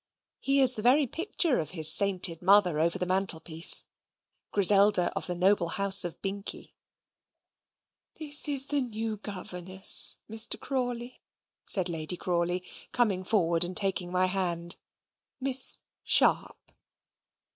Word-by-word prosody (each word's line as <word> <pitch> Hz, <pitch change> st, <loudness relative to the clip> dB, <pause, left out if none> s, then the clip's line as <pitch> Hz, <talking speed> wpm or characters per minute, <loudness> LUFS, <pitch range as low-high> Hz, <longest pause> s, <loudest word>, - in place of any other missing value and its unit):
He 275 Hz, 0 st, -1 dB
is 260 Hz, -1 st, +7 dB
the 215 Hz, -, -7 dB
very 265 Hz, +6 st, +2 dB
picture 330 Hz, -, -2 dB
of 155 Hz, -, -6 dB
his 160 Hz, 0 st, +1 dB
sainted 185 Hz, -4 st, -1 dB
mother 185 Hz, -4 st, +1 dB
over 170 Hz, +3 st, -2 dB
the 180 Hz, -, -5 dB
mantelpiece 175 Hz, -2 st, +1 dB, 0.7 s
Griselda 200 Hz, -1 st, +3 dB
of -, -, -5 dB
the 180 Hz, -, -5 dB
noble 185 Hz, 0 st, -1 dB
house 195 Hz, +2 st, +4 dB
of 175 Hz, -2 st, -9 dB
Binkie. 200 Hz, +1 st, -8 dB, 1.4 s
"This 300 Hz, -1 st, +3 dB
is 275 Hz, -2 st, 0 dB
the 285 Hz, 0 st, -3 dB
new 225 Hz, -3 st, -7 dB
governess, 185 Hz, -2 st, +2 dB
Mr. 225 Hz, +1 st, -1 dB
Crawley," 245 Hz, -2 st, -7 dB, 0.5 s
said 190 Hz, -3 st, +7 dB
Lady 165 Hz, +1 st, -3 dB
Crawley, 175 Hz, +1 st, -4 dB, 0.3 s
coming 205 Hz, -7 st, -2 dB
forward 170 Hz, -4 st, -1 dB
and 180 Hz, +1 st, -6 dB
taking 190 Hz, -3 st, -1 dB
my 185 Hz, 0 st, -1 dB
hand. 175 Hz, -2 st, -3 dB, 0.6 s
"Miss 265 Hz, -1 st, +3 dB, 0.3 s
Sharp." -, -, 0 dB
195 Hz, 125 wpm, -26 LUFS, 175-235 Hz, 1.4 s, is